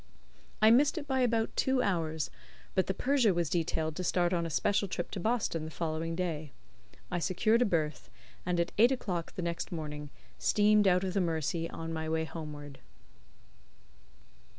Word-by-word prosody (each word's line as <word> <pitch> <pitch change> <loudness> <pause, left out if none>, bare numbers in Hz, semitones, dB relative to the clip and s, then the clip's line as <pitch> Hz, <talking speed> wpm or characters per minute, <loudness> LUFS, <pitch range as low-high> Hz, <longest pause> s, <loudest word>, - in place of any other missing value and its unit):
I 220 - +8
missed 280 +6 +4
it 305 - -3
by 265 -2 0
about 230 -3 +1
two 265 -1 +2
hours, 160 -5 -1 0.4
but 190 - +1
the 190 - 0
Persia 250 -7 +3
was 170 -3 0
detailed 160 -2 0
to 185 - -2
start 175 0 +1
on 170 -1 0
a - - -5
special 200 +6 +1
trip 175 -1 -4
to 200 - -4
Boston 220 -5 0
on - - -5
the - - -5
following 165 0 -2
day. 160 -5 -3 0.6
I 175 - 0
secured 215 +7 +2
a - - +5
berth, 155 - -1 0.3
and 175 -1 0
at 170 - 0
eight 235 +4 +7
o'clock 185 -10 -3
the 180 - -3
next 170 -1 -3
morning 150 -3 -5 0.3
steamed 210 - +4
out 180 0 +4
of 185 -1 -2
the 195 - +2
Mersey 165 0 -1
on 165 0 -5
my 160 0 -3
way 160 0 0
homeward. 150 -3 -8
175 Hz, 180 wpm, -31 LUFS, 160-205 Hz, 0.6 s, I